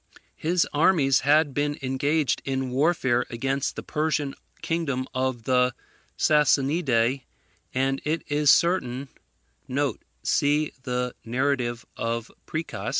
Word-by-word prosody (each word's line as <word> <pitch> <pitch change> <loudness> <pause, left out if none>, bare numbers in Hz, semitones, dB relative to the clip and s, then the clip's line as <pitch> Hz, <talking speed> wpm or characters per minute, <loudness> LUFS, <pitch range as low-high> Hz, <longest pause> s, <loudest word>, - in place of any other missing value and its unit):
His 170 +2 +1
armies 145 -4 +4
had 145 +1 +3
been 145 +1 -1
engaged 140 +3 0
in 130 -1 -2
warfare 130 -3 +2
against 135 +3 -2
the - - -6
Persian 150 -2 -1 0.3
kingdom 145 -6 -1
of 130 -2 -1
the 125 0 +2 0.4
Sassanidae; 140 -4 +2 0.5
and 135 +1 0
it 160 +2 -1
is 150 0 +2
certain 140 -7 +2 1.1
[See 145 +1 +1
the 125 -1 -2
narrative 120 -1 -1
of 115 0 -3 0.2
Priscus. 115 -11 -4
135 Hz, 105 wpm, -25 LUFS, 125-150 Hz, 1.1 s, armies